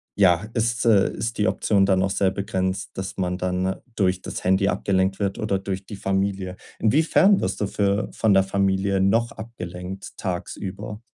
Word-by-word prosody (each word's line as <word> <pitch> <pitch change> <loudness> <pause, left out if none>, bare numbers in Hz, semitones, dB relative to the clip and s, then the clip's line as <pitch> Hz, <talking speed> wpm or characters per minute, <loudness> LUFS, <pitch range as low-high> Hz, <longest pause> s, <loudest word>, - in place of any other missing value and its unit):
ja, 90 -1 +4
ist, 115 0 0
äh, 105 -4 +4
ist 115 0 -4
die 105 - +3
Option 100 -2 +2
dann 95 -2 +3
noch 95 +1 +1
sehr 95 -1 +2
begrenzt, 95 -1 -2
dass 95 0 -5
man 90 -1 -1
dann 90 +1 -1 0.2
durch 95 -2 +1
das - - -6
Handy 95 +1 +3
abgelenkt 95 0 +1
wird 100 -2 -1
oder 105 -2 0
durch 95 0 -5
die 105 - -7
Familie. 95 -1 -1 0.2
Inwiefern 160 - +4
wirst - - -2
du 105 - +1
für 100 +1 0
von 110 -3 +2
der 95 - +5
Familie 95 0 +1
noch 115 +5 +2
abgelenkt, 95 -4 -8
tagsüber? 100 +3 -5
95 Hz, 170 wpm, -23 LUFS, 95-105 Hz, 0.2 s, der